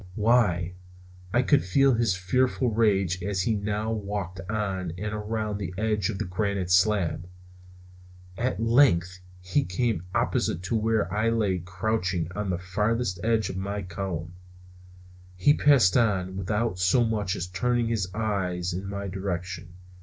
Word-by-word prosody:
Why, 105 -6 +2 0.6
I 120 +4 +3
could 140 +2 +3
feel 135 +8 +3
his 115 -4 +1
fearful 125 +6 +1
rage 100 -5 +2
as 95 0 -1
he 110 - +1
now 105 +1 -2
walked 100 -4 -4
on 95 -5 -2
and 105 +2 -4
around 105 -1 -3
the 95 -2 -5
edge 105 -1 0
of 105 - -3
that - - -3
granite 95 -1 -1
slab. 90 -3 +2 1.1
At 120 0 -1
length 115 -7 +3 0.2
he 90 +11 +1
came 105 -3 -1
opposite 85 - 0
to 95 +5 -1
where 110 -4 +1
I 110 +2 +2
lay 105 -5 +1
crouching 90 -1 -2
on 105 -1 -2
the 90 - 0
farther 105 +6 -1 0.2
edge 115 -1 +1
of 95 - -6
my 100 +1 -3
column. 85 -2 -5 1.0
He 95 +11 +4
passed 140 -11 +4
on 95 -6 +1
without 105 +1 -1
so 95 +7 +3
much 105 -4 -1
as 90 - -3
turning 120 +6 0
his 105 -5 0
eyes 95 -5 -1
in 95 +2 -4
my 100 0 -4
direction. 90 -2 -5
100 Hz, 150 wpm, -26 LUFS, 90-110 Hz, 1.1 s, He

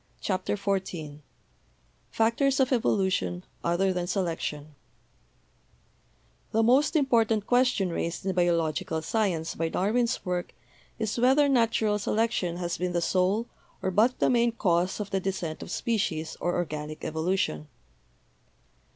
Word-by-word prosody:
CHAPTER 190 +1 -1
XIV 185 -7 -3 0.9
FACTORS 245 +5 +1
OF 265 0 +2
EVOLUTION 190 -6 +1 0.2
OTHER 180 +3 +1
THAN 180 -1 -2
SELECTION 165 -5 -3 1.8
The 225 +1 +2
most 265 +8 +3
important 230 -7 +2
question 245 -7 +2
raised 170 +2 -3
in 190 - 0
biological 165 -3 0
sci 210 +7 0
ence 165 -3 -3
by 165 0 -2
Darwin's 230 +8 0
work 180 -1 -3 0.4
is 220 +1 -2
whether 265 +4 +5
natural 230 -5 +2
selection 210 -5 0
has 175 -1 -3
been 180 0 -1
the 175 - +2
sole, 190 +6 +1 0.4
or 190 - 0
but 225 +6 +3
the - - +2
main, 235 -1 +3
cause 180 -3 +1
of 205 -1 -5
the 195 - +1
descent 180 -4 -3
of - - -8
species, 185 -9 -1
or 175 - -1
organic 155 -3 -4
evolution. 160 - -1
190 Hz, 130 wpm, -27 LUFS, 170-225 Hz, 1.8 s, whether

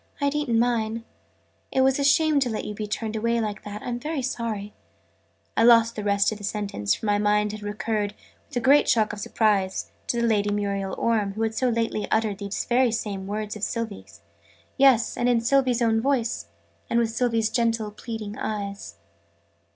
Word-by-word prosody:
"I'd 285 -1 +1
eaten 295 -6 0
mine. 230 -1 0 0.7
It 265 - +2
was 265 +1 +3
a - - +1
shame 305 +1 +4
to 260 -3 0
let 220 - -3
you 210 - -4
be 210 0 -5
turned 220 +1 -3
away 230 +2 +1
like 210 -3 -3
that. 205 +1 -7
I'm 240 -1 -3
very 300 0 -3
sorry 225 -5 -3 0.4
" 85 0 -42
I - - +2
lost 230 -1 +6
the 210 - -4
rest 200 0 +2
of 215 - -6
the - - -11
sentence, 200 - -1
for - - -8
my 205 -1 +2
mind 210 0 +2
had 215 0 -7
recurred, 210 0 -2 0.3
with - - -6
a - - 0
great 280 +4 +5
shock 220 -3 +3
of 210 - -7
surprise, 205 -3 0 0.2
to 235 -1 0
Lady 210 -3 +2
Muriel 200 -2 -2
Orme, 215 -4 +1
who 220 +2 -2
had 225 0 0
so 255 +2 +1
lately 230 -2 -1
uttered 220 -3 0
these 200 -1 -3
very 245 0 +3 0.3
words 210 +2 -4
of 215 - -8
Sylvie's 95 - -4 0.5
yes, 260 -4 +4
and 245 0 +1
in 240 -1 +3
Sylvie's 250 0 +2
own 225 -1 +2
voice, 235 - 0 0.4
and 235 - +1
with 230 -1 +1
Sylvie's 225 -2 +1
gentle 230 -3 0
pleading 215 -1 -7
eyes! 200 - -4
220 Hz, 190 wpm, -25 LUFS, 205-235 Hz, 0.7 s, lost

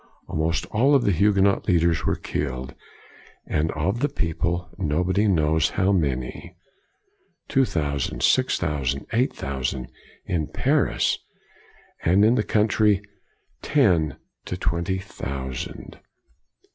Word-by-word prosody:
Almost 80 +2 -1
all 135 +7 +4
of 135 - +3
the 100 - +2
Huguenot 100 +2 +3
leaders 85 -2 +2
were - - +2
killed; 65 -3 -4 0.7
and 75 +1 0
of 95 +9 -1
the 145 +3 +1
people, 85 - -2
nobody 90 +7 +1
knows 80 -4 +2
how 95 +1 +1
many: 75 0 -2 0.9
two 135 -1 +3
thousand, 70 - -2
six - - +3
thousand, 70 -2 -2
eight 125 +3 +2
thousand, 65 -2 -3 0.3
in 80 -4 -1
Paris; - - +1 0.8
and 95 +5 +4
in 115 - +5
the 125 - +2
country, 105 -2 +2 0.6
ten 85 - +2 0.3
to - - -4
twenty 85 +3 -1
thousand. 65 -9 -6
85 Hz, 115 wpm, -24 LUFS, 75-100 Hz, 0.9 s, in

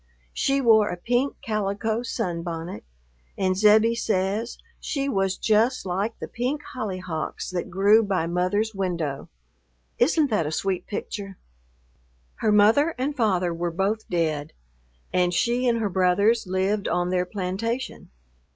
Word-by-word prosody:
She 275 0 +1
wore 220 -4 +5
a 175 - -4
pink 245 +8 0
calico 215 +1 -1
sunbonnet, 170 -5 -4 0.5
and 185 -1 +1
Zebbie 215 +3 +5
says 210 +1 -1 0.2
"she 275 -2 -2
was 195 -7 0
just 225 +3 +2
like 195 +5 -2
the - - -6
pink 265 +5 -3
hollyhocks 185 -11 -4
that 180 -1 -3
grew 200 +4 +5
by 195 -6 0
mother's 185 +6 0
window." 170 -8 -3 0.7
Isn't 290 +2 +3
that 170 -8 +1
a - - -3
sweet 185 +2 -2
picture? 200 -2 -5 1.0
Her 215 - +1
mother 225 +10 +4
and 275 +3 -2
father 185 -8 +1
were 170 +1 -2
both 195 +6 -2
dead, 155 -3 -1 0.6
and 180 -1 +2
she 240 +6 +1
and 235 -1 +3
her 220 -2 0
brothers 190 +4 +2
lived 190 +2 0
on 175 +1 0
their 180 -1 0
plantation. 210 +7 -4
200 Hz, 135 wpm, -25 LUFS, 180-230 Hz, 1.0 s, wore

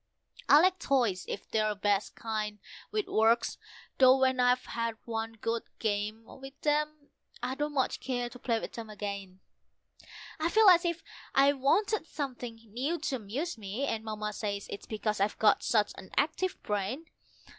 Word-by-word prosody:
I 290 - +9
like 370 +2 +4
toys 240 - +1
if - - -5
they're 215 -1 +2
the 210 - -2
best 205 0 0
kind, 215 -2 -3 0.3
with 425 -1 -1
works; 225 +1 +2 0.4
though 260 0 +8
when 260 -1 +2
I've 250 0 +3
had 230 -1 -3
one 225 -1 -3
good 230 +1 -2 0.2
game 215 +1 -1
with 270 +2 -12
them, 300 0 0 0.3
I 250 +1 -1
don't 295 +2 -3
much 265 -2 +1
care 245 -2 -2
to 250 +1 -11
play 230 -2 0
with - - -6
them 225 -2 -7
again. 200 -3 -6 1.0
I 320 +2 +1
feel 435 +1 +7
as 350 -1 +6
if 340 -1 -1 0.3
I 275 +1 +6
wanted 325 +8 +1
something 250 -6 -5 0.2
new 280 +8 -1
to 280 -5 -2
amuse 240 - -4
me, 210 +7 -3
and 220 -5 -2
Mamma 215 -1 -4
says 200 -1 -3
it's 200 - -7
because 215 -1 -2
I've 200 +1 +1
got 220 - +4
such 210 -3 +2
an 190 - -11
active 320 +5 +1
brain. 210 +9 -2
235 Hz, 170 wpm, -30 LUFS, 215-285 Hz, 1.0 s, I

